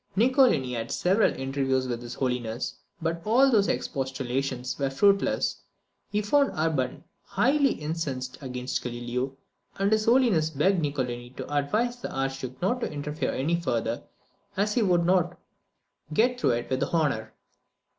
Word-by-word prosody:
Niccolini 235 - +4
had 115 -1 -3
several 195 +5 +3
interviews 135 -1 0
with 120 -1 -3
his 120 -1 -7
Holiness; 125 -2 -2 0.3
but 165 +1 -1
all 260 +5 +4
his 205 -4 +4
expostulations 130 -1 -2
were 135 -1 +1
fruitless. 200 +8 +2 0.5
He 210 +1 0
found 280 +6 +3
Urban 155 -5 0 0.2
highly 275 +1 +2
incensed 145 -5 -4
against 125 -1 -3
Galileo; 125 +2 -3 0.4
and 195 +1 +1
his 215 0 +2
Holiness 230 -10 +4
begged 165 +5 +2
Niccolini 125 -5 -2
to 145 - -5
advise 215 - +1
the 245 - -6
Archduke 135 -1 -3
not 245 +7 +1
to - - -2
interfere 150 +1 -3
any 165 +6 0
farther, 115 -6 -1 0.6
as 210 +2 +1
he 240 - +2
would 175 -4 +3
not 180 -1 +2 0.7
"get 245 +8 +2
through 125 - +3
it 120 0 -3
with 130 - 0
honour." 145 -10 0
145 Hz, 145 wpm, -27 LUFS, 130-200 Hz, 0.7 s, Niccolini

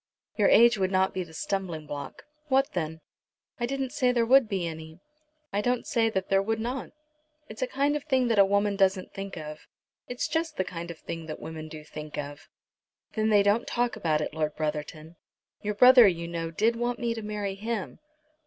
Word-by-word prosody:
"Your 205 - +3
age 235 -1 +6
would 190 -1 +1
not 190 0 +2
be 185 - -2
the 170 - -14
stumbling 175 -2 -3
block." 145 -1 -7 0.2
"What 270 0 +2
then?" 160 -2 -3 0.6
"I 240 - 0
didn't 270 0 -2
say 250 -1 +2
there 240 -2 +2
would 255 -1 +5
be 190 -4 -1
any. 160 -1 -7 0.5
I 205 - +1
don't 245 +2 0
say 225 -1 +2
that 190 -3 -2
there 195 0 +3
would 220 +2 -1
not. 245 +3 -3 0.6
It's 215 +2 -9
a 255 - +1
kind 285 +3 +1
of 295 - -4
thing 260 -4 +2
that 225 -3 +3
a - - +9
woman 200 +1 +1
doesn't 195 -1 +1
think 195 -1 -6
of." 155 -1 -8 0.4
"It's 245 0 -2
just 325 -1 -2
the 185 - +1
kind 170 -1 -7
of 170 - -7
thing 165 0 -7
that 155 - -6
women 160 -1 -7
do 155 -1 -9
think 150 0 -8
of." 145 0 -7 0.6
"Then 220 -1 +1
they 205 -2 +5
don't 205 +4 +2
talk 245 -1 0
about 160 -7 0
it, 150 - -3
Lord 155 -1 -2
Brotherton. 155 +1 -4 0.4
Your 210 0 -2
brother 250 0 +8
you 170 -2 -1
know 165 -1 -3
did 220 +8 +1
want 240 +1 -1
me 235 -1 -1
to 225 - -6
marry 210 -2 -3
him." 215 0 -4
200 Hz, 210 wpm, -27 LUFS, 165-235 Hz, 0.6 s, a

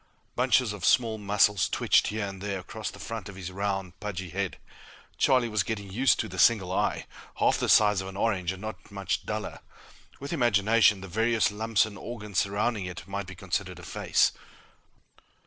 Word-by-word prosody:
Bunches 125 -2 +2
of 100 -3 -9
small 115 -1 +3
muscles 105 -1 +2
twitched - - +3
here 110 -1 -2
and 95 -1 -7
there 100 -1 -3
across 105 +4 -6
the - - -11
front 110 -4 -6
of 100 - -10
his 95 -1 -7
round, 95 -1 -3
pudgy 95 -4 -5
head. 95 0 -3 0.6
Charlie 130 -2 +4
was 110 -3 0
getting 100 -1 -4
used 125 +6 +3
to - - -5
the - - -7
single 100 -6 +4
eye, - - 0 0.3
half - - +2
the - - -1
size 105 -2 +5
of 95 - -7
an 95 0 -8
orange 95 -5 0
and 95 +2 -9
not 110 0 -7
much 100 -2 -3
duller. 105 0 -4 0.6
With 140 +4 -5
imagination, 110 - +3
the 95 - -8
various 110 +4 +1
lumps 110 0 +1
and 105 -1 -9
organs 105 -4 -3
surrounding 100 +1 0
it 90 +1 -8
might 100 0 -4
be 95 - -9
considered - - -3
a - - -12
face. - - +2
105 Hz, 185 wpm, -27 LUFS, 95-110 Hz, 0.6 s, size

